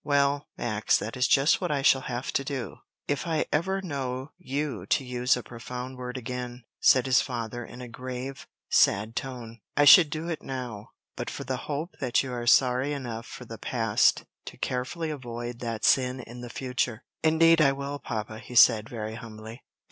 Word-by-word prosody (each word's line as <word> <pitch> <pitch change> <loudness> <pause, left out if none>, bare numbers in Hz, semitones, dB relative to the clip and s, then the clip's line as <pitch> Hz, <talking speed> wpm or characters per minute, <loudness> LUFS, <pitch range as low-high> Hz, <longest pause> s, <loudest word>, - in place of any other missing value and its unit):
"Well, 140 0 +2
Max, 110 -3 +1
that 110 - -5
is 125 0 +2
just 140 +6 +4
what 180 - -1
I 140 -2 0
shall 135 -1 +5
have 125 0 -4
to 135 - +1
do, 135 -3 -5 0.3
if 145 +3 -1
I 160 -2 +1
ever 190 +5 0
know 135 -3 -4
you 140 - -3
to 135 - +2
use 125 0 +1
a 125 - -6
profane 125 +2 -7
word 125 0 -6
again," 125 0 -5 0.2
said 130 -2 +5
his 130 -1 +4
father, 120 -1 -4
in 120 +2 -10
a 125 - -7
grave, 130 +2 -7 0.2
sad 105 +4 +3
tone. 120 -4 -6 0.2
"I 145 - +5
should 160 +2 +9
do 155 +2 -4
it 165 -3 -3
now, 125 -6 -6 0.3
but - - -4
for - - -6
the 130 - -2
hope 155 +5 -3
that 125 -1 +1
you 130 -2 -5
are 120 -1 -4
sorry 130 +3 +4
enough 120 -5 -5
for - - -9
the - - -9
past - - +2 0.2
to - - -9
carefully 155 +6 -2
avoid 120 -3 -6
that 115 -3 -3
sin 130 -1 +3
in 120 +1 -10
the 120 - -7
future." 125 -2 -2 0.2
"Indeed 165 +1 +5
I 140 -3 +6
will, 140 +1 -4
papa," 110 -2 -5
he 125 - -10
said, 110 -2 +6
very 110 -2 -5
humbly. 110 +1 -9
125 Hz, 190 wpm, -27 LUFS, 120-140 Hz, 0.3 s, should